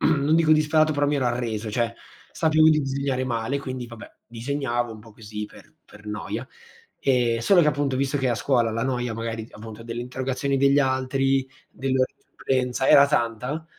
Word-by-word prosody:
non 155 0 +2
dico 160 -1 +4
disperato, 155 0 +3
però 145 0 +1
mi 145 0 +1
ero 130 -3 0
arreso. 115 -3 -2
Cioè, 115 +1 -1 0.4
sapevo 155 -1 +4
di 150 -1 +3
disegnare 135 -1 -1
male, 120 +3 -1
quindi, 130 -2 -5
vabbè, 115 -1 -11 0.2
disegnavo 120 0 -2
un 110 - -11
po' 110 0 -15
così, 105 -1 -7
per - - -15
per 105 +1 -16
noia. 105 +3 -5 0.5
Ehm, 120 -3 +2
solo 180 +8 +5
che, 150 - +4
appunto, 145 -2 0
visto 140 +2 0
che, 130 -1 0
a 120 - +1
scuola 120 -2 +1
la 115 +1 -2
noia, 125 -3 -1
magari 115 0 -4
d - - -16
appunto, 110 +1 -10
delle 115 +1 -5
interrogazioni 130 +2 -2
degli 140 +1 +4
altri, 135 0 +1 0.2
dell'ora 130 -1 0
di - - -37
supplenza, 130 0 -1
era 140 0 +8
tanta, 125 +3 -1
130 Hz, 185 wpm, -24 LUFS, 115-140 Hz, 0.5 s, era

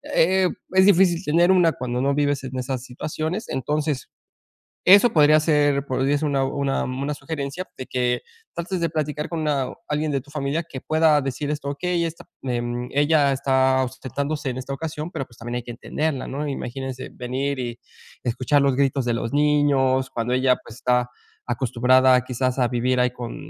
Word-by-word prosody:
eh, 185 +2 +4
mm, - - -12
es 190 - +7
difícil 180 -2 +4
tener 170 +4 +3
una 175 -4 +4
cuando 125 -1 -3
no 140 +1 +1
vives 145 -2 0
en 130 0 -6
esas 125 0 -3
situaciones. 155 - -4
Entonces, 145 +1 -2 0.8
eso 200 +6 +8
podría 155 -1 +6
ser 145 -3 +2
podría 135 +2 +1
ser 155 - -1
una 135 -1 +1
una 140 0 -1
una 135 +3 -3
sugerencia 155 +3 -5
de 130 - -7
que 125 -1 0 0.3
trates 175 +2 -3
de 170 - +1
platicar 150 0 -2
con 160 -3 -2
a 135 -3 0 0.2
alguien 150 0 0
de 135 -2 -1
tu 145 - -20
familia 150 +2 -1
que 145 -5 -8
pueda 155 -1 +3
decir 135 +2 -3
esto: 145 -2 -3
"Okey, 175 +2 -1 0.4
em, 120 -1 -2
ella 145 -1 +3
está 130 0 +2
ausentándose 140 +3 -3
en 125 - -6
esta 130 +2 -5
ocasión, 155 +1 -5
pero 135 - -4
pues, 120 - -21
también 120 +1 -5
hay 120 - -5
que 120 - -7
entenderla, 140 +3 -3
¿no?, 145 +2 -3
imagínese 130 -1 -5
venir 130 +3 -3
y 120 -1 -4 0.4
escuchar 130 +4 +1
los 140 -2 +2
gritos 135 -1 +1
de 120 - +1
los 115 +3 -3
niños, 145 -3 +2
cuando 120 +1 -2
ella 130 0 +3
pues, 110 - -12
está 125 -1 +1 0.4
acostumbrada 125 +1 +3
quizás 130 +1 -1
a 125 - +3
vivir 125 +1 0
ahí 125 0 +3
con 120 -1 -7
140 Hz, 180 wpm, -23 LUFS, 130-150 Hz, 0.8 s, eso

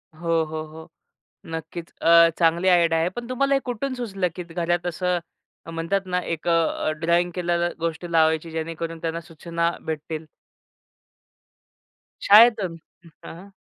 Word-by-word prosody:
हो, 165 0 0
हो, 155 0 -5
हो. 160 +1 -12 0.6
नक्कीच. 165 +1 -7
अ, 170 0 +7
चांगली 170 +2 +2
आयडिया 170 -2 +4
आहे. 165 - +1
पण 240 -1 -6
तुम्हाला 275 +2 +1
हे 275 - +3
कुठून 255 +2 -3
सुचलं, 195 -7 -2
की 180 - -5
घरात 175 +1 -2
असं 180 +1 -1 0.5
म्हणतात 165 +4 -1
ना 180 0 -1
एक 165 -1 -5
अ, 165 -2 +1
ड्रॉइंग 170 +2 +2
केलेल्या 175 -1 0
गोष्टी 165 +1 -4
लावायची 160 0 +2
जेणेकरून 165 +1 -4
त्यांना 165 0 -3
सूचना 170 +1 -2
भेटतील. 155 0 -5 2.0
शाळेतून. 210 -4 +6 0.5
हां. 180 +4 -10
170 Hz, 130 wpm, -23 LUFS, 165-180 Hz, 2.0 s, अ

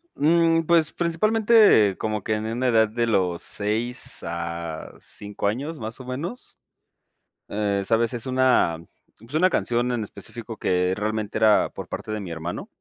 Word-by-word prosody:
Mm, 165 +2 +3
pues, 165 -1 +3
principalmente 205 - +4
como 110 -1 -2
que 110 - -2
en 105 0 -3
una 120 +3 -1
edad 110 -3 +4
de 115 +1 -1
los 90 -6 +1
6 115 +4 -2
a 85 -1 -5
5 100 0 -5
años 140 +9 -3
más, 110 +3 -6
o, 130 - -10
menos, 155 - -6 0.9
eh, 100 -1 -1
¿sabes? 115 +3 +1
Es 120 0 -4
una 130 -10 +2 0.4
es 115 +5 -13
una 180 +4 +4
canción 120 -6 0
en 115 -3 -1
específico 115 +2 -7
que 90 -1 +1
realmente 110 0 -2
era 110 -1 +4
por - - -8
parte - - -6
de 110 - -2
mi 95 -4 -7
hermano. 85 +1 -5
115 Hz, 160 wpm, -24 LUFS, 105-135 Hz, 0.9 s, principalmente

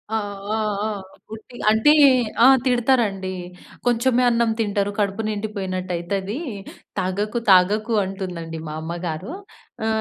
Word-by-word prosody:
ఆ! - - +3 0.4
ఆ! - - 0 0.3
ఆ! - - -2 0.4
ఉట్టి 220 +3 -11 0.2
అంటే 220 +8 +5 0.5
ఆహ్, 265 +1 +8
తిడతారండి. 235 -7 +1 0.5
"కొంచెమే 245 +1 +2
అన్నం 235 -1 +2
తింటరు 205 -2 0
కడుపు 200 +1 0
నిండిపోయినట్టు 195 -3 -4
అయితది, 195 - -3 0.6
తాగకు 205 +5 -1
తాగకు" 210 +5 +4
అంటుందండి 180 -4 -6
మా 155 - -5
అమ్మగారు. 170 - -5 0.5
ఆ! - - 0
205 Hz, 115 wpm, -22 LUFS, 185-230 Hz, 0.6 s, ఆహ్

